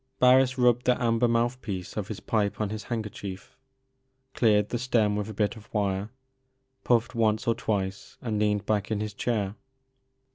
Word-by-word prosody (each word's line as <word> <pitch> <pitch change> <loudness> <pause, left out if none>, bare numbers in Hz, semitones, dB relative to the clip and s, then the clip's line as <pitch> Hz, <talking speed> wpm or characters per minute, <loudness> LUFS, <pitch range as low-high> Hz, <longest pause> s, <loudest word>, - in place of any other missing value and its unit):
Barris 130 +1 +5
rubbed 125 -1 +3
the 125 - +3
amber 115 0 +2
mouth 120 +2 +1
piece 95 -5 -5
of 105 -2 -3
his 110 -3 -6
pipe 100 +1 -1
on 105 -2 -1
his 110 -2 -5
handkerchief, 105 -4 -6 0.8
cleared 105 -3 +3
the 120 - -2
stem 115 -4 +2
with 105 +1 -3
a - - -6
bit 105 +1 0
of 110 -2 -14
wire, 100 -1 -1 0.7
pufied 120 0 +2
once 110 0 +1
or 115 - +4
twice, 100 -4 -3
and 110 -4 -2
leaned 105 -1 +1
back 105 -1 0
in 110 -2 -1
his 105 -1 -3
chair. 105 -3 -1
110 Hz, 175 wpm, -27 LUFS, 105-120 Hz, 0.8 s, Barris